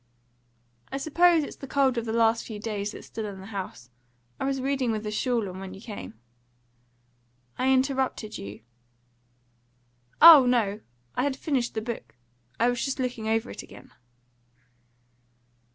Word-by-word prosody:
"I 270 - -2
suppose 325 +3 +4
it's - - -8
the 275 - -9
cold 270 -2 +2
of 235 -1 -2
the 220 - -3
last 225 0 +3
few 220 - -7
days 205 -1 -3
that's - - -10
still 220 -2 -5
in 195 -2 -8
the 190 - -10
house. 190 - -7 0.5
I - - -2
was 270 0 -1
reading 265 -2 0
with 215 -1 -3
a 210 - -3
shawl 230 0 0
on 185 0 -7
when 190 0 -8
you - - -11
came." 210 -1 -8 1.4
"I 260 +1 +1
interrupted 265 -4 0
you." 100 +1 -8 1.6
"Oh 310 -6 +10
no. 215 -5 +1 0.3
I - - -1
had 275 0 0
finished 265 -6 -1
the 220 - -2
book. 235 0 -6 0.4
I 235 - +4
was 245 0 0
just 270 - -2
looking 250 -4 -3
over 225 +2 0
it - - -7
again." - - -14
235 Hz, 160 wpm, -27 LUFS, 210-265 Hz, 1.6 s, Oh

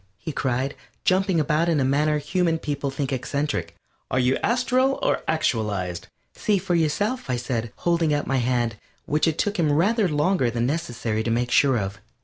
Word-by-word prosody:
he 160 - -5
cried, 135 0 -1 0.3
jumping 190 -2 +3
about 155 +3 +1
in 160 -3 +2
a - - +2
manner 150 +3 +2
human 165 +3 0
people 145 -3 -3
think 135 0 -3
eccentric, 130 - -2 0.3
"are - - -1
you 130 +1 +3
astral 255 +3 +1
or - - +1
actualized?" 105 - -1 0.3
"See 210 -2 +1
for 185 -1 -2
yourself," 175 - 0
I 125 - +1
said, 120 -2 -3
holding 170 -2 +1
out 145 0 0
my 135 - 0
hand, 120 -3 0 0.3
which 155 +3 +1
it 160 -1 0
took 205 -1 -1
him 155 -3 +3
rather 200 +8 +3
longer 150 -2 +2
than 115 0 -1
necessary 120 -7 -2
to 115 - -2
make 120 +2 0
sure 135 -1 +4
of. 100 -1 -3
145 Hz, 180 wpm, -24 LUFS, 125-170 Hz, 0.3 s, sure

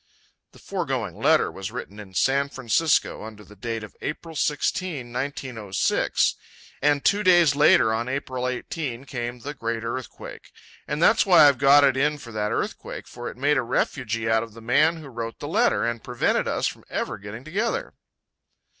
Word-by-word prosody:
The - - -18
foregoing - - -3
letter - - +3
was 95 0 -6
written 105 +2 -7
in 95 -3 -11
San 140 +5 +2
Francisco 140 +4 +1
under 110 -1 -10
the 105 +1 -16
date 115 +2 -4
of 105 - -11
April 160 +1 -5
16, 150 -3 -1
1906. 125 -6 0 0.5
And 145 0 +2
two 205 +1 +3
days 175 -7 +5
later, 140 -6 +5
on 115 +3 -2
April 130 -2 -3
18, 130 0 -4
came 120 -2 -5
the 145 +4 -5
Great 115 -3 -3
Earthquake. 120 +2 -7 0.4
And 150 +3 -1
that's 230 - +5
why 175 -7 +7
I've 140 -4 +3
got 140 +1 +7
it 135 -2 +4
in 150 +3 +1
for 120 -5 -11
that 105 -1 -2
earthquake, - - -4
for 120 0 -7
it - - -11
made 145 +3 +2
a - - +2
refugee 115 -2 -1
out 110 0 +3
of 115 -1 -8
the - - -10
man 150 +8 +3
who 155 -3 -10
wrote 115 -3 -6
the 145 - -6
letter, 220 - +2
and 120 -1 -3
prevented 125 -1 0
us - - -1
from - - -3
ever 110 - -3
getting 105 +4 -9
together. 215 - -2
130 Hz, 180 wpm, -24 LUFS, 115-150 Hz, 0.5 s, why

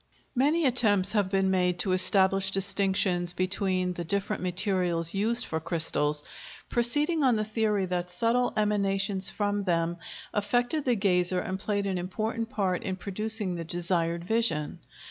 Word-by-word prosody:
Many 295 +6 +2
attempts 210 -7 +2
have 205 -4 +1
been 195 -1 +1
made 180 -1 +1
to 190 - -1
establish 190 +1 +3
distinctions 190 -2 0
between 185 0 0
the 175 - -5
different 200 +4 -2
materials 180 -3 0
used 225 +5 +1
for 160 - -2
crystals, 155 -3 -1 0.5
proceeding 295 +7 +1
on 255 -3 +4
the 215 0 -1
theory 215 -2 0
that 180 -1 -2
subtle 230 +7 +1
emanations 195 -2 +1
from 205 -1 -1
them 170 -1 0 0.4
affected 245 +8 0
the 250 -2 +3
gazer 180 -3 +1
and 185 +1 -4
played 205 0 -1
an 190 -2 -1
important 220 +5 -3
part 195 -7 -1
in 190 - -3
producing 210 +1 -2
the 170 -1 -4
desired 170 0 -1
vision. 185 -7 0
195 Hz, 145 wpm, -28 LUFS, 180-215 Hz, 0.5 s, on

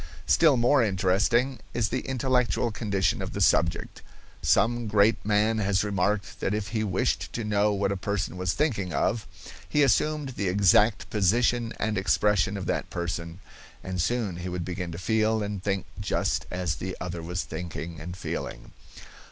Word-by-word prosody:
Still 155 -5 +5
more 125 +3 +4
interesting 105 +6 +1 0.2
is 115 -3 +1
the 130 - -1
intellectual 125 -2 +1
condition 100 -4 0
of - - -5
the - - -4
subject. - - +1 0.4
Some 120 0 +2
great 105 +1 +3
man 110 +1 +2
has 100 -1 +1
remarked 100 0 -1
that 100 - -1
if 105 -3 -3
he 110 -1 -1
wished 100 -4 -1
to 115 - -3
know 105 0 +2
what 100 -1 0
a - - 0
person 95 0 -2
was 90 -1 -1
thinking 105 - -1
of, 110 -2 0 0.4
he 150 - +3
assumed 150 +3 +1
the 105 -6 -3
exact 105 +3 +3
position 115 +3 +2
and 110 -2 -1
expression 100 0 +2
of 95 - -5
that - - -2
person, 85 +1 -4 0.4
and 90 -2 -2
soon 105 -3 -1
he 90 +1 -5
would 90 -1 -4
begin 90 -1 -4
to 85 - -6
feel 110 +3 +1
and 100 -2 -4
think 100 -1 -1
just - - -1
as 90 -5 -2
the 95 +5 -5
other 90 -1 -5
was 90 +2 -3
thinking 85 -2 -6
and 90 +3 -7
feeling. - - -5
105 Hz, 170 wpm, -27 LUFS, 90-115 Hz, 0.4 s, Still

